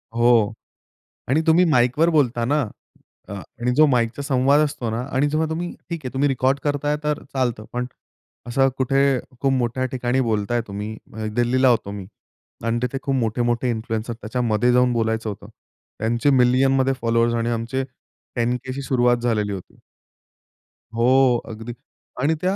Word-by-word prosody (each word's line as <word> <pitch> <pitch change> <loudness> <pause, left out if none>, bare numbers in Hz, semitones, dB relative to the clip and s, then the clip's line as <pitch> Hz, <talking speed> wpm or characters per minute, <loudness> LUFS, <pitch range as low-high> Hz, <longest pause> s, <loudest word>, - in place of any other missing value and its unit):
हो 115 -3 +4 0.8
आणि 150 +5 +3
तुम्ही 170 +3 +5
माइकवर 125 +7 +3
बोलता 125 -7 +2
ना 150 +4 +2 0.7
अ, - - -7
आणि 120 +5 -4
जो 155 - +7
माइकचा 125 -1 0
संवाद 140 +1 +3
असतो 140 -6 -1
ना 115 +2 -2
आणि 135 +2 +2
जेव्हा 155 +1 0
तुम्ही 170 +2 -3 0.2
ठीक 170 -1 -3
आहे 125 - -5
तुम्ही 140 +2 +2
रेकॉर्ड 135 +1 +1
करताय 145 0 0
तर 150 -1 -1
चालतं 120 -5 -1
पण 125 0 -2 0.6
असं 135 +2 +2
कुठे 135 +1 +2 0.4
खूप 135 -1 +2
मोठ्या 130 0 0
ठिकाणी 125 +1 0
बोलताय 115 0 0
तुम्ही 105 +2 -5 0.4
दिल्लीला 125 +2 +3
होतो 115 -4 +1
मी 100 -2 -7 0.6
आणि 115 +1 0
तिथे 125 +2 -1
खूप 135 - -1
मोठे-मोठे 120 +1 0
इन्फ्लुएन्सर 110 0 -3
त्याच्यामध्ये 120 0 0
जाऊन 125 0 +3
बोलायचं 110 -1 -1
होतं. 100 - -7 0.5
त्यांचे 120 +6 +1
मिलियनमध्ये 130 +1 +3
फॉलोअर्स 115 0 +2
आणि 115 0 0
आमचे 120 +3 -2 0.5
10,000 125 +2 -1
अशी 135 +2 -4
सुरुवात 125 -2 +2
झालेली 105 -4 0
होती. 95 -2 -9 1.2
हो, 125 +1 +4
अगदी 115 +2 -7 0.5
आणि 155 +4 +2
त्या 185 +2 +1
125 Hz, 150 wpm, -22 LUFS, 115-135 Hz, 1.2 s, जो